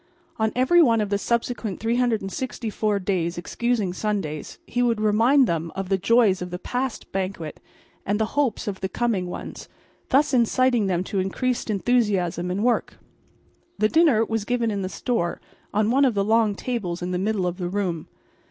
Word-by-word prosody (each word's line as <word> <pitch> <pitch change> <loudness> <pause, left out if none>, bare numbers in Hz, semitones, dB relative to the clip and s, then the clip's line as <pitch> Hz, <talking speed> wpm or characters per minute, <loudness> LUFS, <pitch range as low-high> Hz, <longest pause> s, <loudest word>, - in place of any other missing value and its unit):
On 220 0 +2
every 260 +8 +5
one 230 -7 +4
of 210 -2 -1
the 200 - +1
subsequent 235 -3 -2
364 225 -2 -1
days, 180 -3 -1
excusing 215 +1 -1
Sundays, 185 -7 -3
he 245 - -1
would 235 -3 +2
remind 225 +6 +4
them 165 -4 -2
of 190 -1 -4
the 195 - +2
joys 210 -2 +3
of 180 - -4
the 180 - -4
past 250 +5 -4
banquet 185 -5 -4 0.4
and 205 +2 -1
the 220 - +2
hopes 275 -5 0
of 195 -2 -4
the 190 - -2
coming 210 -5 -1
ones, 175 - -7 0.4
thus 290 +2 +3
inciting 245 -2 +3
them 180 -1 0
to 195 +1 -2
increased 235 +7 -1
enthusiasm 200 -6 +1
in 190 +4 -1
work. 245 0 +1 0.8
The 215 - +2
dinner 295 -9 +4
was 225 -2 -2
given 235 0 0
in 200 -1 -2
the 185 - -3
store 195 -6 -2 0.3
on 215 +2 +1
one 275 +3 +4
of 245 -5 +1
the 200 0 +1
long 220 -1 +3
tables 190 -8 -3
in 180 - -3
the 180 - -1
middle 200 -1 0
of 180 0 -2
the 175 -2 -3
room. 180 -5 -2
215 Hz, 180 wpm, -24 LUFS, 185-240 Hz, 0.8 s, every